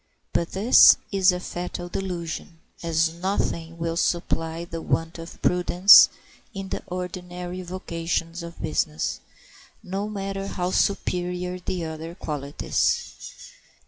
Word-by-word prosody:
But 170 - -1
this 210 +6 +7
is 195 -1 +4
a 180 - -3
fatal 175 0 -5
delusion, 175 -3 -5 0.2
as 165 -1 +1
nothing 170 -2 -2
will 165 0 -2
supply 165 -1 -1
the 165 -1 -6
want 165 +1 -1
of 165 +1 -10
prudence 180 +2 +7 0.5
in 195 -1 -5
the - - -3
ordinary 180 0 -5
vocations 170 -1 -3
of 170 0 -9
business, 155 0 -1 0.6
no 195 +2 -3
matter 195 -1 -4
how 180 -1 -2
superior 180 -2 -1
the 180 -1 -3
other 160 +1 -6
qualities. 150 - -3
175 Hz, 115 wpm, -25 LUFS, 165-185 Hz, 0.6 s, this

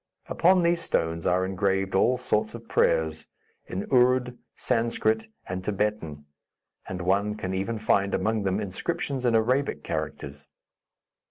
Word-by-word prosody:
Upon 180 +1 +3
these 170 0 +2
stones 80 - -1
are 90 +1 +2
engraved 95 0 0
all 125 +6 +3
sorts 120 -4 -1
of - - -11
prayers, 80 -1 +1 0.4
in 95 - -4
Ourd, 125 -1 +3 0.2
Sanscrit 115 -2 0 0.2
and 90 0 -4
Thibetan, 100 -8 -2 0.6
and 90 -1 -5
one 100 +3 +1
can 95 -3 -4
even 100 +5 -2
find 100 -2 +1
among 110 +3 0
them 95 0 0
inscriptions 135 - -3
in 120 -2 +3
Arabic 130 +5 +1
characters. 70 +1 -5
105 Hz, 135 wpm, -26 LUFS, 95-125 Hz, 0.6 s, Upon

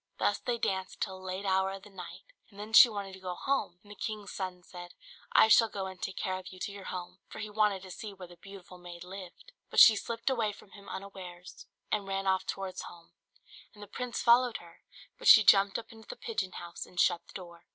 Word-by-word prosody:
Thus - - +1
they 240 -1 -2
danced 190 -4 -2
till 190 -2 -3
a - - -14
late 185 +2 -5
hour 190 0 +2
of 195 0 -9
the 205 - -14
night, 195 - -10 0.3
and 200 -2 -16
then 215 +2 -8
she 235 - +10
wanted 200 -3 -6
to 190 - -10
go 180 -1 -5
home: 270 -9 -1
and 205 - -15
the - - -9
king's 210 -1 -5
son 185 -2 -5
said, 175 -1 -11 0.4
"I - - +6
shall 225 +1 +6
go 195 -2 -4
and 190 -1 -9
take 190 - -4
care 185 0 -2
of 185 - -12
you 185 - -10
to 190 - -4
your 200 -1 -10
home;" 180 0 -7
for - - -11
he 210 0 -6
wanted 210 -3 +1
to 185 - -10
see 210 +4 -7
where 190 -2 -11
the 175 - -15
beautiful 190 -1 -13
maid 175 -1 -10
lived. 185 - -11 0.2
But - - +2
she 220 - +10
slipped 230 +4 -2
away 225 -5 0
from 200 - -17
him 200 0 -13
unawares, 185 -2 -9 0.2
and 205 -2 -1
ran 195 0 -2
off 190 -1 +1
towards 190 -1 -4
home, 170 -1 -12 0.6
and 205 - -11
the - - -10
prince 245 +4 -4
followed 240 0 +5
her; 170 -1 -16 0.4
but - - -3
she 215 - +10
jumped 195 0 +5
up 230 -1 -9
into 225 -1 -15
the - - -7
pigeon 440 - -4
house 170 0 -8
and 180 - -9
shut 175 -1 +2
the - - -16
door. 170 -2 -10
195 Hz, 245 wpm, -30 LUFS, 185-210 Hz, 0.6 s, she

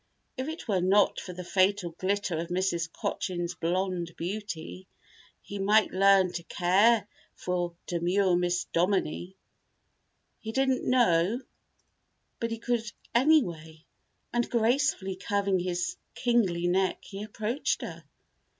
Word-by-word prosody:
If 260 0 -4
it 320 -2 -6
were 195 -5 +1
not 195 +3 +3
for 185 - -7
the 180 +1 -7
fatal 185 0 +1
glitter 185 -1 -1
of 170 - -3
Mrs. 175 -2 -1
Cochin's 175 -1 -3
blonde 175 0 -2
beauty, 185 -1 -5 0.6
he 200 - -7
might 210 +3 +4
learn 195 -1 +4
to 170 - -3
care 200 +7 +3 0.3
for 175 -1 -2
demure 180 +2 +1
Miss 175 0 +1
Dominie. 180 0 0 1.0
He 220 0 -6
didn't 265 0 +1
know 225 -3 +3 1.0
but 230 - -1
he 230 - -3
could, 230 -1 -2 0.2
anyway, 175 - +2 0.5
and 240 0 0
gracefully 235 -5 +1
curving 200 -1 0
his 180 - -2 0.2
kingly 205 -9 +1
neck 185 +2 +1
he 195 0 -8
approached 215 +5 -2
her. - - -7
190 Hz, 125 wpm, -28 LUFS, 175-220 Hz, 1.0 s, might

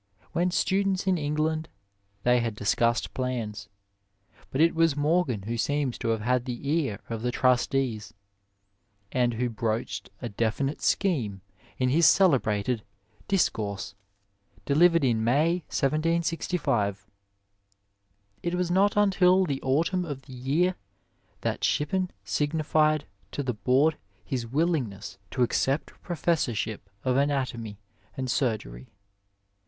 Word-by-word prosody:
When 175 +2 +1
students 190 +1 +1
in 185 -3 +2
England 155 +2 -1 0.5
they 125 0 +4
had 115 -2 -2
discussed 115 +3 +1
plans, 115 -6 -3 0.8
but 130 - -3
it 165 +2 +5
was 165 -3 +3
Morgan 145 - +1
who 115 +3 -3
seems 145 +1 0
to 120 - -3
have 115 -1 0
had 125 +2 +1
the 125 +2 -5
ear 145 -9 0
of 115 -1 -4
the 125 - 0
trustees, 125 -3 +1 1.0
and 120 -2 +1
who 125 +2 0
broached 115 0 -3
a 120 - -4
definite 115 +6 -1
scheme 120 - 0 0.4
in 130 -1 +1
his 160 +4 +5
celebrated 125 - +3 0.2
" 110 -1 -32
Discourse," 105 - 0 0.7
delivered 165 +3 +4
in 115 -4 +2
May, 155 +9 +2
1766. 155 - 0 1.4
It 175 +1 -1
was 180 -1 -1
not 200 +3 +3
until 190 -2 +4
the 140 -5 -3
autumn 165 +7 +1
of 145 -5 -6
the 135 - -12
year 150 +9 0 0.6
that - - -2
Shippen 180 +6 +1
signified 155 +6 +1 0.3
to 145 - -2
the 125 -2 -1
board 130 +9 +2 0.3
his 125 -3 -3
willingness 120 - -1
to 125 - +1
accept 135 +4 0
a - - -26
professorship 130 - -1
of 130 0 +1
anatomy 130 -7 -1 0.4
and 130 -2 -2
surgery. 105 - -2
135 Hz, 125 wpm, -27 LUFS, 115-165 Hz, 1.4 s, it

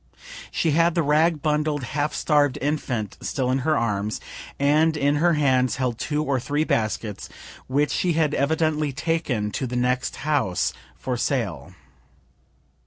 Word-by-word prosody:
She 165 - 0
had 165 +2 +3
the 170 - +2
rag 155 +1 +2
bundled, 150 -2 0
half 145 +4 -1
starv'd 145 -4 +2
infant 125 -8 -2
still 130 -2 -1
in 130 - +1
her 155 +3 +1
arms, 105 -2 -1 0.4
and 155 +3 +3
in 145 0 +2
her 170 +3 +3
hands 130 -5 +2
held 125 -3 -2
two 150 0 -1
or 140 -3 0
three 145 +5 0
baskets, 110 -5 -2 0.4
which 145 +2 +1
she 180 -2 +1
had 155 -2 +1
evidently 155 0 +1
taken 145 -8 -1
to 130 - -3
the 125 - -5
next 125 +1 0
house 135 -11 0 0.2
for - - -3
sale. - - -2
145 Hz, 150 wpm, -24 LUFS, 125-155 Hz, 0.4 s, had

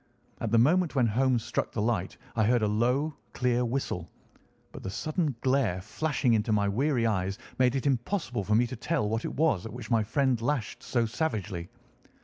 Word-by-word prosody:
At 115 - -2
the 115 - +3
moment 160 +7 +3
when 130 -3 +4
Holmes 120 +1 +2
struck - - -2
the 110 - -1
light 100 -5 -1 0.2
I 110 - +3
heard 120 0 +3
a - - +3
low, 125 +8 +1 0.2
clear 125 -1 +1
whistle, 115 -9 -2 0.6
but - - -9
the - - -5
sudden 155 - -1
glare 130 -9 +2
flashing 125 +5 0
into 110 0 +1
my 105 -1 +2
weary 125 +3 +1
eyes 95 -3 0 0.2
made 125 0 +4
it 135 - -2
impossible 130 - 0
for 105 +3 +1
me 120 +3 +4
to 130 - -5
tell 140 0 -1
what 115 +2 -1
it - - -4
was 145 - +2
at - - -10
which 120 -1 -8
my 115 -1 +4
friend 125 +2 +1
lashed 125 -2 -2
so 120 -2 0
savagely. 110 - -3
120 Hz, 195 wpm, -28 LUFS, 110-135 Hz, 0.6 s, when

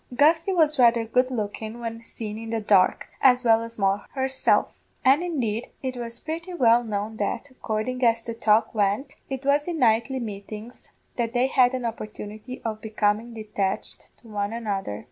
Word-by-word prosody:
Gusty 320 +6 +4
was 310 -5 +3
rather 235 -2 +5
good 250 +3 +2
lookin' 220 -1 -4
when 230 -1 -5
seen 220 -2 -7
in 225 0 -7
the 225 0 -1
dark, 205 -3 +3
as 255 -1 +5
well 225 -1 +5
as 230 0 -7
Moll 195 0 +2
herself; 265 0 +2 0.4
and, 270 +5 +6
indeed, 245 -11 -2
it 260 -1 -2
was 235 -1 -6
purty 335 +3 -5
well 240 -5 +5
known 215 0 -3
that 220 +6 -3
accordin' 250 +1 -3
as 230 -1 +3
the 230 - -4
talk 220 -1 +2
went 215 +6 0 0.2
it 270 0 -5
was 285 +2 +2
in 345 -2 -2
nightly 235 +1 +2
meetings 215 +1 -8 0.3
that 235 -1 -1
they 245 +1 +3
had 260 -1 +3
an 250 -2 -3
opportunity 215 +1 -6
of 220 -1 -3
becomin' 220 +1 0
detached 210 -3 -4
to 235 - -19
one 205 0 -2
another. 200 - -3
230 Hz, 175 wpm, -25 LUFS, 215-255 Hz, 0.4 s, and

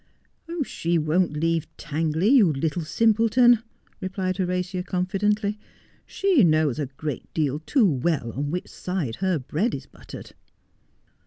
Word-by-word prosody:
' - - -45 0.2
She 170 -8 -1
won't 160 +2 +1
leave 165 +1 0
Tangley, 160 +4 0
you 235 - +6
little 155 +4 -1
simpleton,' 230 +6 +4 0.4
replied 185 -1 -3
Horatia 180 0 -1
confidently. 200 +3 -1 0.5
'She 380 - +3
knows 155 -5 +2
a 145 - -1
great 140 +1 -6
deal 150 -2 0
too 230 - +2
well 145 -6 0
on 145 +5 -3
which 180 +4 -3
side 175 -11 -4
her 185 -2 0
bread 160 - -1
is 135 - -8
buttered.' - - -12
175 Hz, 135 wpm, -24 LUFS, 155-200 Hz, 0.5 s, you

